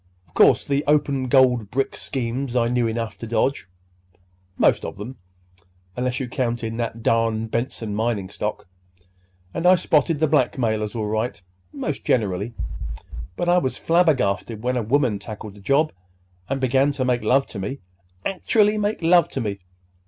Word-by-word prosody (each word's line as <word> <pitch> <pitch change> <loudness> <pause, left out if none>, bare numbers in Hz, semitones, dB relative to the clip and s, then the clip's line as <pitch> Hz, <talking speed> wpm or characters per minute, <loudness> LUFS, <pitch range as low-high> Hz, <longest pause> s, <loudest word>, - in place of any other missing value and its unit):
Of 80 - -29
course, - - +5
the 140 +1 0
open 140 -3 +2
gold 125 -5 +4
brick 135 +4 -1
schemes 125 0 -3
I 120 -1 +2
knew 120 -1 +1
enough 115 0 -3
to 115 - -6
dodge, 115 0 0 0.9
'most - - +3
of - - -6
'em 120 +5 -7 0.8
(unless 125 0 -1
you 130 - -3
count 120 -1 -2
in 115 0 -3
that 115 -1 -3
darn 115 -1 +2
Benson 115 -1 -3
mining 110 -2 -1
stock), 105 +1 -4 0.9
and 165 - 0
I 185 - +8
spotted 160 -2 +2
the 155 - +3
blackmailers 120 -7 +1
all 110 -2 -1
right, 110 +3 -2 0.3
most - - -4
generally. 105 0 0 0.8
But 175 - -2
I 175 +1 +5
was 130 -7 -2
flabbergasted 125 - +1
when 125 +1 0
a 125 - +1
woman 115 -2 +1
tackled 105 -1 -8
the 100 - -15
job 140 +8 +2 0.6
and 135 0 -1
began 135 +2 +3
to 135 -2 -1
make 125 -1 +1
love 135 +5 +3
to 100 - -7
me—actually 100 - -1
make 210 -3 -1
love 170 +1 +5
to - - -4
me! 100 -3 -3
120 Hz, 160 wpm, -23 LUFS, 110-140 Hz, 0.9 s, I